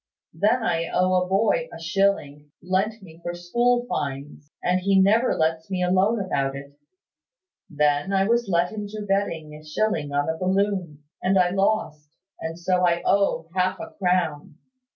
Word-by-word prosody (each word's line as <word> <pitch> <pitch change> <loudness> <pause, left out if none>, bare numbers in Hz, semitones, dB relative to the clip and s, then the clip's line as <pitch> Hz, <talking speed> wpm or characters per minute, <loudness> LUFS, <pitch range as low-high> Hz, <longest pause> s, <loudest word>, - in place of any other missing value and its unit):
Then 215 +8 +1
I 165 -4 0
owe 185 0 +1
a 180 - -2
boy 225 - +1
a - - -9
shilling, 160 -4 0
lent 195 +4 -1
me 165 -3 -14
for 175 0 -4
school 240 +8 +1
fines; 145 - -5
and 180 +1 +2
he 195 +1 +3
never 215 +6 +3
lets 160 +1 -1
me 185 -2 -1
alone 190 +5 +2
about 140 -8 -1
it. 140 +1 -10 0.9
Then 150 +4 +1
I 195 0 +2
was 235 +1 +1
led 175 +1 +1
into 210 0 -6
betting 170 -6 -1
a 150 0 -11
shilling 155 -2 -1
on 145 0 0
a 160 0 -2
balloon, 185 -5 -1 0.2
and 190 +1 +2
I 180 -1 +3
lost; 195 -6 -1 0.3
and 160 0 -5
so 180 +1 0
I 175 -1 +2
owe 180 -5 +1
half 185 0 0
a 220 - -7
crown. 175 -6 0
180 Hz, 165 wpm, -24 LUFS, 160-200 Hz, 0.9 s, he